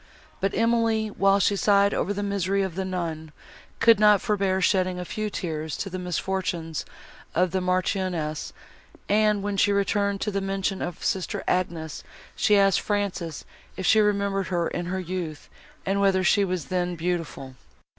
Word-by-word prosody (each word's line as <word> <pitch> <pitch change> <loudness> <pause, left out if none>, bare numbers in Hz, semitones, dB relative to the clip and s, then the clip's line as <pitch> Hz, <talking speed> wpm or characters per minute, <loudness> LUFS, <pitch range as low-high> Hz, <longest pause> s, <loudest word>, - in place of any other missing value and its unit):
But 195 0 -1
Emily, 225 -1 +2
while 195 -1 +3
she 200 +1 +2
sighed 200 0 +3
over 200 - -1
the 205 0 -2
misery 200 -1 0
of 190 -3 -3
the 190 +3 -2
nun, 165 -4 -4 0.5
could 230 -3 +6
not 210 -1 +6
forbear 195 -2 0
shedding 185 -1 +1
a 180 - -4
few 215 +4 -3
tears 160 -5 -4
to 195 - -4
the 185 - -4
misfortunes 180 -2 -2 0.5
of 180 +1 +2
the 190 - 0
Marchioness; 180 -4 -1 0.6
and, 210 -1 +2
when 205 -1 -2
she 205 - +4
returned 200 0 +1
to 210 - -1
the 200 0 -1
mention 195 0 -2
of 175 -1 -5
sister 190 -2 -1
Agnes, 165 -4 -2 0.3
she 210 - +3
asked 195 -2 +4
Frances 195 -6 -2 0.3
if 190 - -3
she 220 - +5
remembered 200 -2 +1
her 175 -2 0
in 175 0 -4
her 190 +1 -2
youth, 175 -4 -5 0.4
and 195 +1 +1
whether 190 -1 +3
she 200 +2 +4
was 180 -5 -2
then 180 -1 0
beautiful. 165 -6 -3
190 Hz, 165 wpm, -25 LUFS, 175-200 Hz, 0.6 s, could